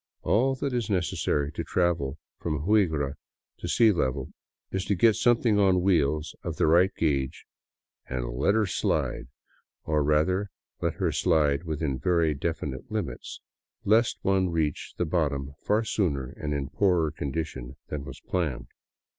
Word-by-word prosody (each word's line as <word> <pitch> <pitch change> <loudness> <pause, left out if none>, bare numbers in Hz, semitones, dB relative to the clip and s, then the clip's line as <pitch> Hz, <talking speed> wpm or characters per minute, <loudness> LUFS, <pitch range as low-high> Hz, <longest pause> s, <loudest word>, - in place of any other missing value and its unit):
All 130 +5 +2
that 135 0 -3
is 120 -4 -1
necessary 85 -6 0
to - - -4
travel 85 -6 0 0.2
from 75 -3 -2
Huigra 80 -10 +2 0.5
to - - -5
sea 115 -2 +5
level 65 -9 -1 0.4
is 95 -1 -1
to 100 - +1
get 110 +4 +4
something 115 -3 +3
on 95 -3 +4
wheels 75 -5 +1
of - - -4
the - - +2
right 85 +4 +5
gage 70 -5 -1 0.6
and 65 -2 -2
" - - -5
let 100 +9 +3
her 110 -1 +3
slide 90 -8 -1 0.2
" - - -37
— - - -63
or 75 -1 +1
rather, 80 +7 +2 0.3
let - - 0
her - - 0
slide 75 -3 +2
within 75 -4 -2
very 85 +1 +2
definite 75 -2 -4
limits, - - -4 0.4
lest 115 +4 +3
one 95 -1 +2
reach 80 -3 -2
the 90 - 0
bottom 70 -5 -1
far 105 +2 +3
sooner 75 - -1
and 75 - -5
in 70 -1 -3
poorer 90 -5 +2
condition 70 -4 -4
than 75 -2 -4
was - - -9
planned. 70 -9 -2
80 Hz, 160 wpm, -27 LUFS, 70-95 Hz, 0.6 s, sea